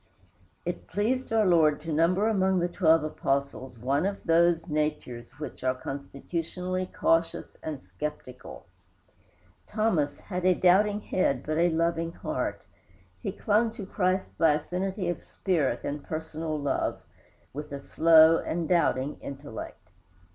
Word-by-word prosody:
It -, -, -4 dB
pleased 250 Hz, +5 st, -1 dB
our 220 Hz, -1 st, +3 dB
Lord 160 Hz, -5 st, +4 dB
to 160 Hz, 0 st, -4 dB
number 180 Hz, +7 st, +3 dB
among 190 Hz, -3 st, +2 dB
the 175 Hz, 0 st, +1 dB
twelve 165 Hz, -3 st, +3 dB
Apostles 140 Hz, -4 st, -2 dB
one 140 Hz, -, 0 dB
of 200 Hz, 0 st, -3 dB
those 170 Hz, 0 st, +3 dB
natures 135 Hz, -6 st, -3 dB
which 150 Hz, -3 st, -7 dB
are 130 Hz, 0 st, +1 dB
constitutionally 170 Hz, +7 st, -4 dB
cautious 165 Hz, -1 st, 0 dB
and 150 Hz, -9 st, -6 dB
skeptical. 125 Hz, +6 st, -7 dB, 1.0 s
Thomas 210 Hz, -10 st, 0 dB
had 180 Hz, -2 st, -5 dB
a 185 Hz, 0 st, +4 dB
doubting 205 Hz, +4 st, +4 dB
head 140 Hz, -12 st, 0 dB
but 155 Hz, +1 st, -1 dB
a 175 Hz, +1 st, +4 dB
loving 165 Hz, 0 st, 0 dB
heart; -, -, -3 dB, 0.6 s
he -, -, -2 dB
clung 220 Hz, +2 st, +1 dB
to 210 Hz, -4 st, -7 dB
Christ 185 Hz, 0 st, -1 dB
by 160 Hz, -3 st, +5 dB
affinity 185 Hz, +5 st, -2 dB
of 175 Hz, -2 st, -2 dB
spirit 165 Hz, -8 st, -1 dB
and 145 Hz, 0 st, -4 dB
personal 155 Hz, 0 st, -4 dB
love, 140 Hz, -1 st, -1 dB, 0.5 s
with 150 Hz, +1 st, -7 dB
a 140 Hz, -, -4 dB
slow 160 Hz, +2 st, +6 dB
and 165 Hz, -1 st, -2 dB
doubting 150 Hz, -5 st, +1 dB
intellect. 135 Hz, -9 st, -8 dB
165 Hz, 135 wpm, -28 LUFS, 145-185 Hz, 1.0 s, slow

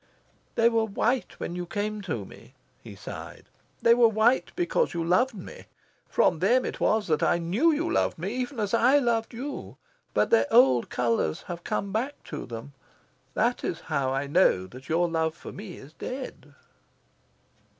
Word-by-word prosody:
"They 230 Hz, -, +4 dB
were 225 Hz, -1 st, +2 dB
white 230 Hz, +4 st, -1 dB
when 175 Hz, -, -4 dB
you 175 Hz, -1 st, -4 dB
came 210 Hz, +3 st, -3 dB
to 110 Hz, -8 st, -2 dB
me," -, -, -15 dB, 0.3 s
he -, -, -11 dB
sighed. -, -, -9 dB, 0.4 s
"They 230 Hz, -, +7 dB
were 235 Hz, -1 st, +6 dB
white 225 Hz, +4 st, +2 dB
because 365 Hz, +7 st, 0 dB
you 170 Hz, -, -1 dB
loved 200 Hz, +9 st, +2 dB
me. 185 Hz, -, -10 dB, 0.4 s
From 160 Hz, -, +2 dB
them 240 Hz, +8 st, +3 dB
it -, -, -5 dB
was 215 Hz, -1 st, +2 dB
that 155 Hz, -3 st, +1 dB
I -, -, +3 dB
knew 195 Hz, -, +2 dB
you 315 Hz, +2 st, 0 dB
loved 335 Hz, -, +1 dB
me 185 Hz, +6 st, -3 dB
even 255 Hz, 0 st, -3 dB
as 205 Hz, 0 st, -1 dB
I 250 Hz, +5 st, +5 dB
loved 235 Hz, -4 st, +1 dB
you. 270 Hz, +5 st, -6 dB, 0.4 s
But -, -, +2 dB
their 470 Hz, -, +4 dB
old 130 Hz, -, +5 dB
colours 115 Hz, -10 st, 0 dB
have 175 Hz, -1 st, -7 dB
come 200 Hz, -, -2 dB
back 250 Hz, +8 st, -1 dB
to -, -, -6 dB
them. 120 Hz, +4 st, -8 dB, 0.6 s
That 240 Hz, +3 st, +1 dB
is 165 Hz, -, -3 dB
how 140 Hz, -4 st, -1 dB
I 135 Hz, +1 st, -1 dB
know 140 Hz, -, +3 dB
that 130 Hz, +8 st, -13 dB
your 170 Hz, +2 st, +2 dB
love 160 Hz, -1 st, -1 dB
for -, -, -10 dB
me 195 Hz, -3 st, -9 dB
is 140 Hz, +3 st, -13 dB
dead." 255 Hz, +9 st, -7 dB
205 Hz, 180 wpm, -27 LUFS, 160-240 Hz, 0.6 s, They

